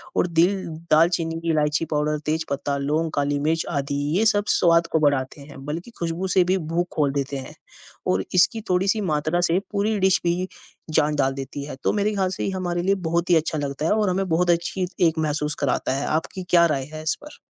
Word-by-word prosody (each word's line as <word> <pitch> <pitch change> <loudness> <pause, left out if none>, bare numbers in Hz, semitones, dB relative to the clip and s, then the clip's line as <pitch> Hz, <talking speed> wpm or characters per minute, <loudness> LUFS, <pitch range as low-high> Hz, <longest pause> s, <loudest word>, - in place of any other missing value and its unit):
और - - +2
दिल 175 +3 +2 0.3
दाल 160 +2 +6
चीनी, 165 -2 -2
इलायची 150 0 +1
पाउडर, 150 0 +1
तेज़ 160 +1 -1
पत्ता, 140 0 -2
लोंग, 155 +4 -1
काली 145 0 0
मिर्च 160 +3 0
आदि 140 -3 -2 0.2
ये 220 - +2
सब 205 -2 +3
स्वाद 170 -1 +4
को 160 - +3
बढ़ाते 145 -2 0
हैं 140 -1 -11
बल्कि 165 +10 -5
खुशबू 170 +2 -2
से 185 - +6
भी 185 +2 +1 0.2
भूख 175 +1 +1
खोल 145 -3 +2
देते 140 0 -2
हैं 130 - -8 0.6
और 95 +1 +1
इसकी 180 +5 +3
थोड़ी-सी 195 +4 +2
मात्रा 155 -1 0
से 170 +3 +3
पूरी 210 +1 0
डिश 190 0 +4
भी 175 +2 0 0.5
जान 150 -1 +2
जाल 135 -2 +1
देती 135 +1 -6
है। 145 - -7
तो - - +2
मेरे 205 0 +1
हिसाब 195 -3 0
से 190 - -4
ये - - 0
हमारे 175 -2 -2
लिए 195 +2 +2
बहुत 170 +1 0
ही 175 - +6
अच्छा 160 0 +1
लगता 145 +1 -3
है - - +2
और 210 -2 +2
हमें 190 +1 0
बहुत 175 +2 +2
अच्छी 175 +2 +1 0.2
एक 160 0 -1
महसूस 150 -1 -1
कराता 135 -2 0
है। 140 - -2
आपकी 165 +4 -2
क्या 170 -1 +6
राय 140 -5 0
है 155 0 -6
इस 155 - +1
पर? 300 - -12
165 Hz, 220 wpm, -23 LUFS, 150-180 Hz, 0.6 s, दाल